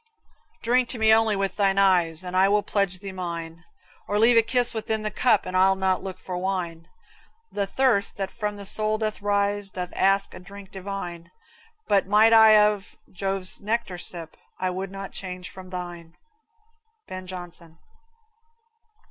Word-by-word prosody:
Drink 245 +1 +2
to 250 - -3
me 220 0 +5
only 220 -1 +3
with 195 -1 -2
thine 195 -2 +2
eyes, 180 -4 +3
And 180 0 -6
I 190 +1 +5
will 205 0 +2
pledge 200 -2 -1
thee 195 +1 -8
mine; 170 -2 -6 0.4
Or 205 - 0
leave 230 +3 +5
a 230 - +7
kiss 245 +1 +1
within 220 -1 -2
the 215 - -2
cup, 245 -5 +2
And 185 - -5
I'll 190 +1 +4
not 190 -1 0
look 190 -1 -6
for 180 - -6
wine. 180 -3 -3 0.6
The 200 -1 -2
thirst 230 -4 +1
that 195 -1 -3
from 210 -2 -3
the 200 - -8
soul 215 +2 -1
doth 215 -1 -3
rise 205 0 +1
Doth 180 -1 -5
ask 195 +1 +2
a - - -9
drink 195 +1 -12
divine; 180 -3 -6 0.6
But 195 -2 +2
might 215 +3 +5
I 220 -1 +8
of 210 -1 +1
Jove's 195 0 -1
nectar 205 -4 -2
sip, 170 -2 -5 0.2
I 185 0 -1
would 190 +1 -4
not 195 0 -7
change 180 -1 -7
from 185 -1 -11
thine. 175 -2 -7 0.9
Ben 185 0 -7
Jonson. 175 -2 -9
195 Hz, 170 wpm, -25 LUFS, 180-210 Hz, 0.9 s, I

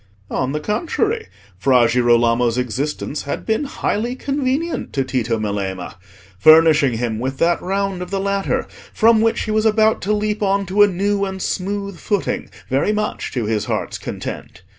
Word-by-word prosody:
On 130 +1 -1
the 150 - -2
contrary, 370 - -1 0.3
Fra 125 +1 +4
Girolamo's 120 0 +3
existence 135 +4 -2
had 140 - -5
been 220 +6 0
highly 240 -3 -2
convenient 280 +4 -2
to 135 - +1
Tito 120 -3 -1
Melema, 100 -4 -3 0.5
furnishing 155 -3 +6
him 115 -2 -2
with 130 +2 -3
that 170 +3 +2
round 195 0 -2
of 180 - -5
the 195 0 -2
ladder 200 0 -1 0.3
from 225 -1 +4
which 225 0 +1
he 215 - -3
was 215 0 +2
about 220 0 +3
to 200 - -1
leap 210 +1 -1
on 200 0 +1
to 195 +3 +1
a 205 - +8
new 200 +2 0
and 190 -1 -3
smooth 200 0 -3
footing 205 +4 -2 0.2
very 135 +10 +1
much 210 0 -2
to 120 -4 -1
his 105 -1 -1
heart's - - -3
content. 90 - -7
185 Hz, 165 wpm, -20 LUFS, 125-210 Hz, 0.5 s, a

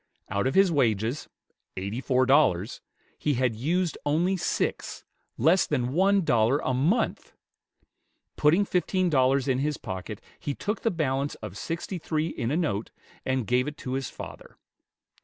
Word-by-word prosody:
Out 100 +5 0
of 135 - -1
his 195 -2 +5
wages 120 -2 0 0.5
eighty 100 +6 -3
four 130 0 +2
dollars 115 - +2 0.4
he 150 -2 +1
had 125 -1 +1
used 165 +8 -1
only 170 +6 +1
six, 175 - -2 0.3
less 165 +9 +4
than 130 -3 -1
one 195 +3 +3
dollar 120 -1 +3
a 130 - -1
mouth! 165 - 0 1.0
Putting 170 +7 +3
fifteen 185 -1 0
dollars 135 0 +3
in 130 -1 +1
his 150 +1 -1
pocket, 95 -5 -6 0.2
he 145 - -3
took 210 +2 -3
the 230 - +2
balance 145 -6 -1
of 105 -4 -8
sixty 170 - -4
three 155 0 -1
in 115 - -3
a 150 - 0
note, 115 - -1 0.4
and 130 -2 0
gave 125 +3 +1
it 150 0 -5
to 130 - -5
his 135 -1 -2
father. - - -10
140 Hz, 160 wpm, -27 LUFS, 125-165 Hz, 1.0 s, his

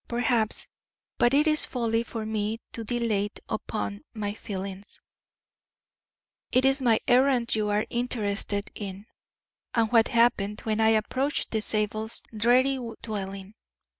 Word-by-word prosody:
Perhaps 235 -2 +1 0.5
but 240 - +4
it 290 +3 +4
is 305 -1 +3
folly 230 -2 0
for 225 -1 -5
me 215 0 -1
to 230 - -5
dilate 220 -3 -1
upon 100 - -3
my 205 -2 -2
feelings; 200 -2 -7 1.5
it 255 +1 +4
is 270 +1 +3
my 230 -4 +4
errand 250 -1 +3
you 215 -1 +1
are 205 +1 +1
interested 210 -4 0
in, 200 0 -7 0.7
and 225 -2 +2
what 230 -2 +5
happened 220 -3 +2
when 220 0 -1
I 220 - +5
approached 255 +6 0
the 220 - 0
Zabels' 215 +1 -1
dreary 255 +5 +3 0.2
dwelling." 195 -2 -5
220 Hz, 130 wpm, -27 LUFS, 205-240 Hz, 1.5 s, what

